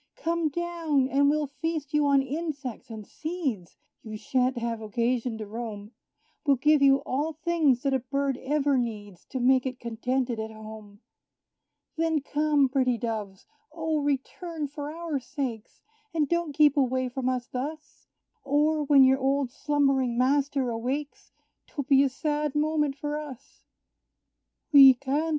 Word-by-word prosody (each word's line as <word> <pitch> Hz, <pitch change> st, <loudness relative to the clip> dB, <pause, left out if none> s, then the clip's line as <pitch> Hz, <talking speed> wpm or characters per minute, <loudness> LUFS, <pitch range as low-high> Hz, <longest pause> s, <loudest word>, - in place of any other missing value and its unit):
Come 335 Hz, -1 st, -1 dB
down, 330 Hz, -4 st, 0 dB
and 280 Hz, +1 st, +3 dB
we'll 300 Hz, 0 st, +1 dB
feast 300 Hz, +1 st, -4 dB
you 300 Hz, -1 st, +3 dB
on 275 Hz, -1 st, +4 dB
insects 280 Hz, -4 st, -5 dB
and 220 Hz, -2 st, -8 dB
seeds; 285 Hz, -, -4 dB, 0.2 s
You 215 Hz, -1 st, -7 dB
sha'nt 255 Hz, +3 st, 0 dB
have 230 Hz, -1 st, -3 dB
occasion 235 Hz, +2 st, -1 dB
to 215 Hz, -, -6 dB
roam 215 Hz, -1 st, -7 dB, 0.5 s
We'll 285 Hz, -3 st, +4 dB
give 300 Hz, +3 st, +3 dB
you 275 Hz, 0 st, +5 dB
all 295 Hz, +5 st, -1 dB
things 310 Hz, -5 st, +1 dB
that 275 Hz, -1 st, +1 dB
a 265 Hz, -, +2 dB
bird 275 Hz, +2 st, -1 dB
ever 285 Hz, -1 st, +1 dB
needs, 205 Hz, -6 st, -5 dB
To 260 Hz, -, -5 dB
make 255 Hz, +1 st, +3 dB
it 255 Hz, -1 st, -6 dB
contented 240 Hz, +1 st, -2 dB
at 220 Hz, 0 st, -4 dB
home. 215 Hz, -1 st, -11 dB, 1.0 s
Then 325 Hz, -1 st, +1 dB
come, 295 Hz, -1 st, +2 dB
pretty 255 Hz, -2 st, +1 dB
Doves! 215 Hz, -5 st, -5 dB, 0.3 s
O, 320 Hz, -1 st, -1 dB
return 295 Hz, +3 st, -3 dB
for 290 Hz, +1 st, -6 dB
our 325 Hz, -3 st, -3 dB
sakes, 245 Hz, -3 st, -6 dB, 0.3 s
And 305 Hz, -3 st, +2 dB
don't 340 Hz, -2 st, -1 dB
keep 295 Hz, -1 st, +4 dB
away 260 Hz, -1 st, +1 dB
from 255 Hz, +1 st, -2 dB
us 250 Hz, -1 st, -2 dB
thus; 295 Hz, +5 st, -7 dB, 0.4 s
Or, 300 Hz, +2 st, +2 dB
when 280 Hz, -1 st, +6 dB
your 265 Hz, +1 st, +4 dB
old 270 Hz, -1 st, 0 dB
slumbering 275 Hz, -4 st, +1 dB
master 270 Hz, 0 st, +1 dB
awakes, 260 Hz, +6 st, -4 dB, 0.4 s
'Twill 285 Hz, -, -4 dB
be 275 Hz, -2 st, +5 dB
a 275 Hz, -, +2 dB
sad 295 Hz, +1 st, -2 dB
moment 300 Hz, -2 st, +1 dB
for 295 Hz, +1 st, -3 dB
us! 280 Hz, -3 st, -11 dB, 1.1 s
"We 270 Hz, -3 st, +9 dB
can't!" 275 Hz, +5 st, -1 dB
275 Hz, 150 wpm, -27 LUFS, 245-300 Hz, 1.1 s, We